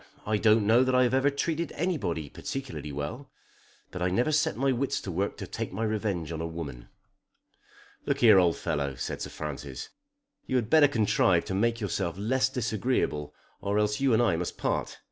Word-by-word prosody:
I 110 0 +1
don't 110 0 +4
know 115 +4 +5
that 130 0 +1
I've 125 -1 +4
ever 135 +2 +4
treated 160 +3 -2
anybody 140 - -1
particularly 125 - -6
well. 75 - -5 0.6
But 90 - -6
I 90 - +2
never 120 +11 +1
set 155 -8 +1
my 135 +2 +2
wits 130 +2 -1
to 95 - -5
work 95 +4 -2
to - - -5
take - - -5
my 100 +5 -3
revenge 105 -7 -2
on 80 -1 -4
a 85 - -2
woman." 75 -8 -7 1.2
"Look - - 0
here, 110 -5 +8
old 85 -2 +3
fellow," 70 -2 -2
said - - -4
Sir - - -4
Francis. 70 -3 -6 0.6
"You 130 - -1
had 120 -3 0
better 155 -2 +7
contrive 105 -8 +2
to - - -4
make 115 +4 +1
yourself 95 -4 -2
less 130 +6 +1
disagreeable 115 - -1 0.3
or 100 +1 0
else 105 0 +1
you 135 -1 +2
and 115 +1 +4
I 95 -8 +2
must 90 +1 -4
part. - - -2
110 Hz, 190 wpm, -28 LUFS, 85-130 Hz, 1.2 s, here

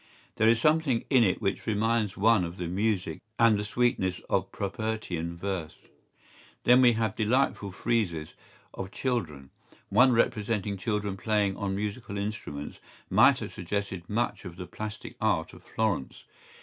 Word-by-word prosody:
¬Ý - - -45
There 110 +1 +5
is 115 0 +4
something 155 -3 +2
in 130 -3 +6
it 95 -4 +1
which 95 - -1
reminds 110 -1 +1
one 110 -1 +4
of 85 +1 -5
the 90 - -3
music 95 -3 -1 0.2
and 115 -2 +5
the - - -2
sweetness 105 -5 0
of 95 0 +1
Propertian 100 -5 -3
verse.¬Ý 90 -3 -5 0.7
Then 125 +1 +6
we 120 -2 +6
have 110 -1 -1
delightful 110 -3 +1
friezes 90 -7 -1 0.4
of 95 - -5
children.¬Ý 85 - -3 0.4
One 130 +1 +6
representing 105 -3 +1
children 105 0 -2
playing 105 -2 +1
on 100 -1 -2
musical 105 +1 -4
instruments 100 -8 -5 0.3
might - - +6
have - - -6
suggested 95 -1 -4
much 115 +3 -1
of 90 -3 -8
the 90 0 -7
plastic 105 +3 -7
art - - +1
of - - -13
Florence. 105 - -2
105 Hz, 150 wpm, -28 LUFS, 95-115 Hz, 0.7 s, in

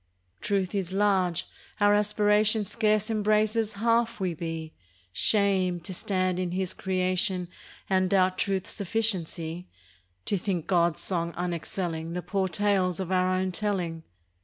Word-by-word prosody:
Truth 195 -2 -1
is 190 -3 -2
large. 190 -3 +1 0.3
Our 205 0 +5
aspiration 210 +1 +3
Scarce 215 +1 +1
embraces 215 +1 +1
half 230 +1 +1
we 185 -3 -1
be. 165 -1 -5 0.4
Shame! 190 - +2
to 180 +3 -6
stand 185 -1 -1
in 180 -1 -2
His 185 0 -1
creation 185 -1 0 0.4
And 185 -1 +2
doubt 185 -1 +2
Truth's 190 -2 -1
sufficiency! 180 -5 -2 0.6
To 200 - 0
think 175 -4 -2
God's 170 -3 +2
song 170 -2 -2
unexcelling 170 -1 -3
The 180 - -3
poor 190 +2 0
tales 190 -2 +1
of 190 -1 -3
our 185 0 +2
own 185 0 0
telling. 180 -5 -1
190 Hz, 135 wpm, -27 LUFS, 175-205 Hz, 0.6 s, Our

